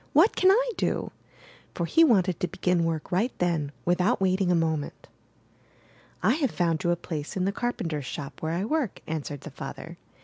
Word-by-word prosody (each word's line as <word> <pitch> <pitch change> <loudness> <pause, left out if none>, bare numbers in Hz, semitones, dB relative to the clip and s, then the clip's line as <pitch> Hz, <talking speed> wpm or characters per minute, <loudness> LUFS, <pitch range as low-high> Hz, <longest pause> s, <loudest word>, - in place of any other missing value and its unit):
— - - -34
^what 345 +9 +6
can 370 - +5
I - - +4
do?'' - - -1 0.3
— - - -24
for 170 - -1
he 325 - +5
wanted 190 - +3
to 180 - 0
begin 180 -2 0
work 160 -2 -3
right 210 +8 +1
then, 165 -5 0
without 180 +7 +2
wait 190 0 +2
ing 180 -2 +2
a - - +4
moment. 160 -3 -2 1.2
'T 265 - +4
have 275 -5 +2
found 165 -5 0
you 175 - +1
a 175 - +3
place 160 -1 -5
in 185 - +1
the 195 - +1
carpenter's 165 - -3
shop 140 +2 -7
where 160 - -1
I 180 +4 -1
work," 285 -4 -1
answered 145 -3 -4
the - - -9
father. - - -8
180 Hz, 205 wpm, -27 LUFS, 160-225 Hz, 1.2 s, ^what